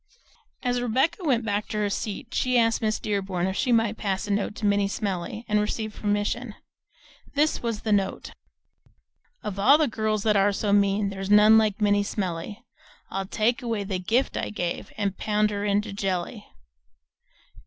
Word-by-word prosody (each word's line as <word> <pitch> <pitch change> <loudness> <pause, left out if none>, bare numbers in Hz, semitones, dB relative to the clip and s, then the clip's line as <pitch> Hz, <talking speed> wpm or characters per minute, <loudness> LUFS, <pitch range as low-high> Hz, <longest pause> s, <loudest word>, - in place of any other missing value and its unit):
As 245 -1 0
Rebecca 265 - 0
went 250 -7 +1
back 205 0 -1
to 215 - -4
her 210 -1 0
seat 215 +3 -4
she 255 -1 +1
asked 230 0 +2
Miss 215 -1 0
Dearborn 195 -4 -2
if 190 0 -2
she 250 +4 0
might 225 -2 +2
pass 195 -2 -1
a 205 - -4
note 205 0 -1
to 225 - -4
Minnie 200 -1 +2
Smellie 200 +2 -4
and 210 -1 +2
received 215 0 -2
permission. 210 +2 -2 0.8
This 300 +2 +2
was 230 -3 -3
the 220 - -1
note: 200 -2 0 1.1
Of 205 -2 -4
all 270 +9 +6
the 310 -1 +2
girls 215 -2 -1
that 215 -1 +3
are 200 +1 +3
so 200 0 0
mean 200 0 +2
There's 195 0 -5
none 210 +1 +7
like 215 -2 0
Minnie 205 -1 +3
Smellie. 200 +2 -4 0.5
I'll 195 0 -3
take 235 +6 0
away 230 -4 -2
the 190 -2 -3
gift 230 +9 0
I - - -2
gave 175 -4 -4
And 200 -2 -2
pound 210 0 +1
her 205 0 -3
into 205 0 0
jelly. 195 +1 -3
210 Hz, 175 wpm, -25 LUFS, 200-225 Hz, 1.1 s, none